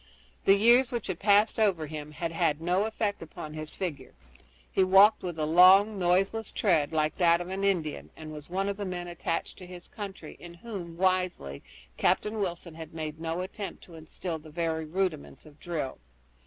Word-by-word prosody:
The 195 - +7
years 240 +5 +5
which 240 -3 -3
had 185 -3 -4
passed 205 +2 +3
over 190 -7 +2
him 150 0 -7
had 165 +2 -4
had 165 -3 +1
no 180 +5 +1
effect 215 -2 -2
upon 155 -1 -8
his 155 0 -7
figure. 150 -9 -5 0.6
He 190 - +3
walked 195 +3 +6
with 175 -3 -5
a 155 - 0
long, 190 +6 +6
noiseless 195 +5 +1
tread, 165 -8 +1
like 155 -1 0
that 170 -2 +4
of 175 +1 -6
an 190 +1 -3
Indian, 175 -6 -1
and 155 -1 -8
was 150 +1 -10
one 190 +2 -1
of 200 0 -2
the 205 - -4
men 180 -1 -4
attached 170 -1 -4
to 180 - -10
his 180 -1 -11
company 195 -7 -8
in 170 0 -11
whom, 175 -4 -8
wisely, 180 - 0 0.4
Captain 215 +1 +1
Wilson 175 -3 -3
had 160 0 -10
made 155 -1 -5
no 165 +2 -2
attempt 195 +2 -7
to 175 - -15
instill 160 +1 -6
the 155 +1 -14
very 160 0 -2
rudiments 165 -3 -3
of 150 -1 -17
drill. 160 -6 -4
175 Hz, 190 wpm, -28 LUFS, 160-195 Hz, 0.6 s, The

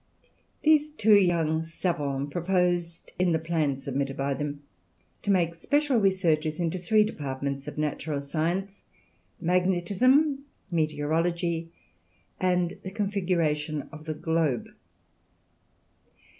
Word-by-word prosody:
These 305 -1 +4
two 220 -8 +3
young 170 -5 +3
savants 145 -4 -2
proposed 175 -1 0
in 180 -2 +3
the - - +3
plan 160 -4 0
submitted 135 0 -3
by 140 0 0
them 145 +1 -4 0.6
to - - -5
make 175 -4 +3
special 285 - +1
researches 165 -6 +1
into 175 +1 -1
three 210 +5 +4
departments 140 -7 -4
of - - -7
natural 150 0 -2
science 175 +7 -2 0.6
magnetism, 200 - +2 0.3
meteorology, 165 +2 0 0.7
and 180 -2 +1
the 190 - -6
configuration 175 -7 -1
of 155 -1 -11
the 155 -1 -3
globe. 160 -6 0
170 Hz, 105 wpm, -27 LUFS, 155-190 Hz, 0.7 s, These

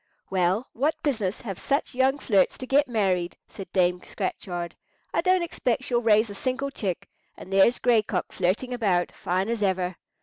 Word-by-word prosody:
"Well, 190 +5 +1
what 290 +6 +1
business 220 -10 -1
have 195 -6 -6
such 280 0 -1
young 265 +2 +2
flirts 200 -9 +2
to 255 - -6
get 280 +3 +3
married?" 190 -7 0
said 195 - -10
Dame 180 -1 +2
Scratchard. 175 -3 -4 0.4
"I - - +2
don't 370 0 +3
expect 260 -6 -1
she'll 240 -2 +1
raise 215 -1 +4
a - - -6
single 260 +6 -2
chick; 195 -9 -3 0.3
and 190 - -9
there's 195 +5 +5
Gray 240 -3 +4
Cock 200 -4 -3
flirting 195 +8 0
about, 195 -7 +1
fine 185 +1 -1
as 230 -1 -2
ever. 185 -2 0
215 Hz, 175 wpm, -26 LUFS, 185-255 Hz, 0.4 s, there's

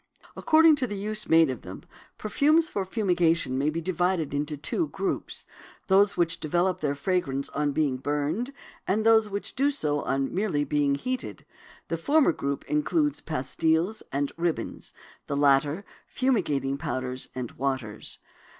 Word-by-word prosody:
According 315 -1 +5
to 260 -3 -1
the 205 -2 -5
use 215 +2 -2
made 160 -3 +5
of 130 - -6
them, - - -9 0.3
perfumes 305 +9 +2
for 195 -2 -2
fumigation 175 - +1
may 140 +3 +1
be 165 +2 -3
divided 175 -3 0
into 145 +1 -2
two 310 - -1
groups: 390 - -4 0.4
those 200 +1 +4
which 170 -1 +1
develop 175 +4 0
their 145 -2 -1
fragrance 140 -4 -1
on 145 0 -1
being 140 -3 0
burned, 150 - -2 0.4
and 215 +3 +1
those 220 -1 +5
which 200 0 -4
do 280 +2 +2
so 150 - -1
on 135 0 0
being - - -6
merely 145 -7 +1
heated. 255 - -4 0.4
The 165 - -2
former 285 - +3
group 140 -3 -3
includes 300 -1 0
pastils 160 +7 0
and 140 0 -1
ribbons, 170 -1 -3 0.4
the 140 - -2
latter 145 +6 +3 0.2
fumigating 145 - 0
powders 130 -4 -4
and 125 -2 -4
waters. 130 -5 -3
165 Hz, 150 wpm, -27 LUFS, 140-215 Hz, 0.4 s, According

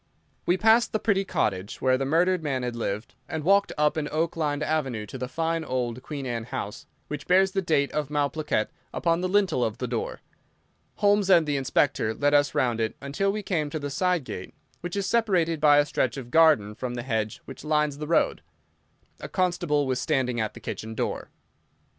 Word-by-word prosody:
We 180 - +3
passed 225 +3 +4
the 215 - +1
pretty 200 -3 +1
cottage 100 - -2
where 130 -1 +3
the 135 +1 -1
murdered 175 +5 +2
man 135 -5 -2
had 120 -1 -3
lived, 105 -2 -3 0.2
and 160 -1 -3
walked 200 +4 +4
up 150 +1 +2
an 150 -1 -2
oak 160 +2 0
lined 150 -2 -1
avenue 135 -9 -1
to 130 - -8
the 125 - -3
fine 165 +3 -1
old 125 -3 -2
Queen 140 0 -6
Anne 115 -3 -3
house, 105 -3 -6 0.2
which 150 -1 -6
bears 190 +1 +4
the 195 - 0
date 155 -5 +1
of 150 -2 -2
Malplaquet 150 -5 0 0.3
upon 170 0 +1
the 185 - -1
lintel 190 -10 +2
of 110 0 -2
the 125 - -3
door. 120 -2 -3 0.7
Holmes 205 -1 +3
and 170 -4 +6
the 145 -1 -1
Inspector 130 -4 +1
led 145 +3 +1
us 145 0 +3
round 120 -3 +1
it 110 - -1
until 145 +9 -1
we 210 +1 -4
came 160 -6 -1
to 155 - -3
the 145 -2 -4
side 180 +1 +1
gate, 95 -7 -8 0.2
which 175 +1 -5
is 200 -1 -1
separated 185 -7 +1
by 145 -1 +6
a 145 - +5
stretch 130 -4 -1
of 120 -3 -8
garden 155 -11 +5
from 125 +3 -5
the 120 - -4
hedge 110 -4 -2
which 135 -1 -10
lines 150 -2 0
the 150 - -4
road. 165 - +2 0.8
A - - -7
constable 175 -6 +1
was 130 -1 -1
standing 125 -3 0
at 110 - -3
the - - -9
kitchen 110 0 -6
door. - - -3
150 Hz, 205 wpm, -26 LUFS, 125-175 Hz, 0.8 s, and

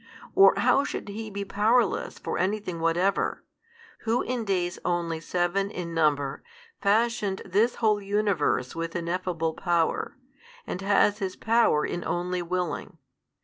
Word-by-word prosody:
or 390 0 +7
how 275 - +4
should 205 - -5
He 215 +2 -6
be 200 -1 -4
powerless 220 +5 +1
for - - -4
anything 185 -3 -1
whatever, 175 +4 +1 0.6
who 230 +2 0
in 245 -3 -3
days 180 -3 -1
only 170 -2 -1
seven 180 +4 0
in 175 -4 -5
number, 145 -4 +1 0.4
fashioned 210 -1 +1
this 210 +6 +2
whole 215 -2 +2
universe 200 -10 0
with 165 +1 -4
ineffable 170 -1 -2
Power, 170 - 0 0.5
and 180 - -5
has 200 +1 +3
His 190 -2 -3
Power 225 -9 +3
in 175 - -3
only 180 +1 -2
willing? 180 +1 -3
185 Hz, 135 wpm, -27 LUFS, 170-210 Hz, 0.6 s, or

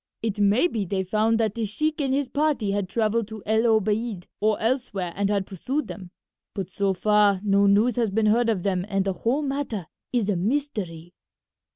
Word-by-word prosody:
It 215 -2 -2
may 205 +8 +4
be 225 - -2
they 190 0 -2
found 215 +4 +1
that 220 -3 +1
this 225 -2 -3
sheik 305 +8 -1
and 270 -2 0
his 275 0 +1
party 280 -6 0
had 200 -2 -2
travelled 220 0 0
to 220 -2 -9
El 220 +2 +2
Obeid 215 -2 0
or 215 0 +1
elsewhere 220 -7 -1
and 200 0 0
had 200 -2 0
pursued 255 - -3
them, 185 -4 -8 0.5
but 190 -2 -4
so 200 +1 +1
far 210 0 +3
no 200 -1 +3
news 210 +4 +3
has 230 -3 +2
been 215 +3 +1
heard 230 +2 +3
of 195 -6 0
them 185 -3 0
and 195 -1 0
the 195 - 0
whole 250 +10 0
matter 270 - -3 0.3
is 235 -5 0
a 205 - +1
mystery." 185 - -2
215 Hz, 200 wpm, -25 LUFS, 195-235 Hz, 0.5 s, may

